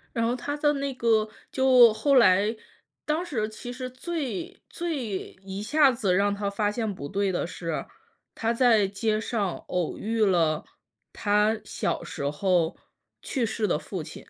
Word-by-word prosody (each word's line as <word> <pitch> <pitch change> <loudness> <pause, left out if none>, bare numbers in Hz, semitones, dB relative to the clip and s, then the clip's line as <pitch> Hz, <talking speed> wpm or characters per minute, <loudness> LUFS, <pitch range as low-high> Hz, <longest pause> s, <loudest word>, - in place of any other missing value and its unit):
然 230 -1 +1
后 235 - +1
他 290 +4 -4
的 295 0 +2
那 275 -1 -3
个 225 -3 +2 0.2
就 255 -4 +6
后 280 +5 +1
来 215 -2 +5 0.5
当 315 +4 -1
时 220 -10 -2
其 230 +3 -8
实 255 0 -6
最 335 +6 -5
最 275 - -4
一 195 +1 -5
下 295 +4 +4
子 220 -7 0
让 200 +2 +2
他 200 0 -2
发 205 +1 0
现 215 -1 -2
不 140 -5 -7
对 200 +1 0
的 175 - -1
是， 165 -2 -4 0.5
他 230 +1 -1
在 230 -5 +4
街 215 +2 -1
上 210 -5 -2
偶 180 -3 -2
遇 220 0 +1
了 165 -5 +2 0.5
他 210 +1 +2
小 - - -2
时 140 0 -3
候 175 0 +1 0.4
去 260 -4 -2
世 220 -1 -1
的 180 - +1
父 180 +1 -6
亲。 - - -10
220 Hz, 175 characters per minute, -26 LUFS, 200-255 Hz, 0.5 s, 就